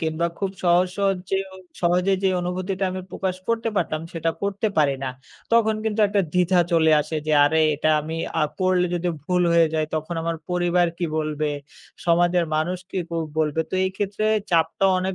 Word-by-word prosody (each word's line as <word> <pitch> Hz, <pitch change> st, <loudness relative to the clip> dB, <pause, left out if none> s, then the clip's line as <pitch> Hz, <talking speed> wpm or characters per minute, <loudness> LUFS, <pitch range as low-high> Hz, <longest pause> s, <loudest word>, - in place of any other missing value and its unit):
কিংবা 160 Hz, +1 st, 0 dB
খুব 195 Hz, -1 st, -1 dB
সহজ, 175 Hz, +1 st, +4 dB
সহজ 195 Hz, -1 st, +2 dB
যে 195 Hz, -, +2 dB, 0.5 s
সহজে 180 Hz, +3 st, +2 dB
যে 190 Hz, -, +3 dB
অনুভূতিটা 185 Hz, +2 st, -2 dB
আমি 185 Hz, -, -4 dB
প্রকাশ 185 Hz, -1 st, -3 dB
করতে 230 Hz, 0 st, 0 dB
পারতাম 155 Hz, -3 st, 0 dB
সেটা 165 Hz, 0 st, -1 dB
করতে 200 Hz, +2 st, 0 dB
পারি 140 Hz, -2 st, +3 dB
না। 130 Hz, -, -2 dB, 0.4 s
তখন 220 Hz, -2 st, +4 dB
কিন্তু 220 Hz, 0 st, 0 dB
একটা 200 Hz, 0 st, +2 dB
দ্বিধা 180 Hz, 0 st, +3 dB
চলে 160 Hz, -1 st, +4 dB
আসে 155 Hz, +2 st, -4 dB
যে 155 Hz, -, +1 dB
আরে 160 Hz, +2 st, +2 dB, 0.2 s
এটা 155 Hz, +2 st, 0 dB
আমি, 160 Hz, +2 st, -5 dB, 0.2 s
আ -, -, +3 dB, 0.2 s
করলে 185 Hz, -1 st, +3 dB
যদি 175 Hz, 0 st, -1 dB, 0.2 s
ভুল 180 Hz, +1 st, +1 dB
হয়ে 165 Hz, -1 st, +5 dB
যায় 155 Hz, -1 st, +1 dB
তখন 155 Hz, +2 st, -3 dB
আমার 165 Hz, 0 st, -2 dB
পরিবার 175 Hz, 0 st, +2 dB
কি 175 Hz, -, -1 dB
বলবে? 155 Hz, -1 st, -1 dB, 0.6 s
সমাজের 175 Hz, +1 st, +3 dB
মানুষ 175 Hz, +4 st, -1 dB
কি 190 Hz, -, -3 dB
ক -, -, -47 dB, 0.3 s
বলবে? 155 Hz, 0 st, +1 dB
তো -, -, -3 dB
এই 190 Hz, -, 0 dB
ক্ষেত্রে 205 Hz, +1 st, -2 dB, 0.3 s
চাপটা 170 Hz, +3 st, +2 dB
অনেক 185 Hz, +1 st, -2 dB
175 Hz, 185 wpm, -23 LUFS, 160-190 Hz, 0.6 s, হয়ে